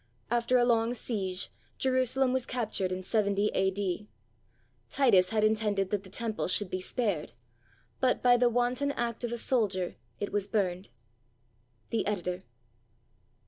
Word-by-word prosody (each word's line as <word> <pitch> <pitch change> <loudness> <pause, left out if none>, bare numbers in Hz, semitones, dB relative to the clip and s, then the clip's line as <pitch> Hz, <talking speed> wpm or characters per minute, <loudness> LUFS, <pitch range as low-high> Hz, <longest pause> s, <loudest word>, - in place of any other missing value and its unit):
After 240 +1 +3
a 240 - +4
long 235 0 +2
siege, 195 -6 -2 0.3
Jerusalem 260 0 +2
was 260 -2 0
cap 235 -4 -2
tured 185 -3 -1
in 185 0 -3
70 205 0 +1
A.D. 190 +1 -1 0.8
Titus 205 -10 +4
had 215 0 +1
intended 210 -3 +1
that 205 -2 0
the 195 - -14
Temple 220 +2 -3
should 185 +1 -1
be 185 - -2
spared; 200 - -2 0.7
but 255 -1 +1
by 245 -1 +6
the 245 0 +4
wanton 245 +4 +1
act 235 -1 -3
of 240 - -2
a 240 - -2
soldier 205 -7 0 0.2
it 205 - -3
was 205 -1 0
burned. 190 -3 -1 1.0
The 225 - 0
Editor. 180 -3 -2
215 Hz, 145 wpm, -30 LUFS, 190-240 Hz, 1.0 s, by